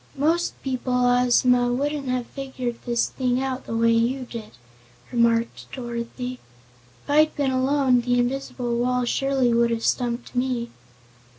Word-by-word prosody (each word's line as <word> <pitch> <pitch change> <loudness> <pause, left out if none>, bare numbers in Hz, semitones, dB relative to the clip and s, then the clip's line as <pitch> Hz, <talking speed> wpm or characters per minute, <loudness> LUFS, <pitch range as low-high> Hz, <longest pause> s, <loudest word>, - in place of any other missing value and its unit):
"Most 330 +5 +1
people, 255 -1 -2
Ozma, 245 0 +3
wouldn't 285 +2 -1
have 250 -1 -1
figured 255 -3 -5
this 235 -1 +1
thing 250 -1 0
out 260 -1 -3
the 225 - -2
way 230 0 +4
you 235 +3 +1
did," 230 -3 -8 0.6
remarked 235 -1 +1
Dorothy. 245 0 -5 0.6
"If - - -22
I'd 310 +1 +4
been 280 -3 0
alone 260 -1 +2
the 245 +1 +1
invisible 245 -1 -1
wall 250 0 +1
surely 265 -1 +1
would 235 0 +3
have 230 -1 -2
stumped 240 0 -1
me." 245 -2 -1
250 Hz, 140 wpm, -24 LUFS, 235-265 Hz, 0.6 s, way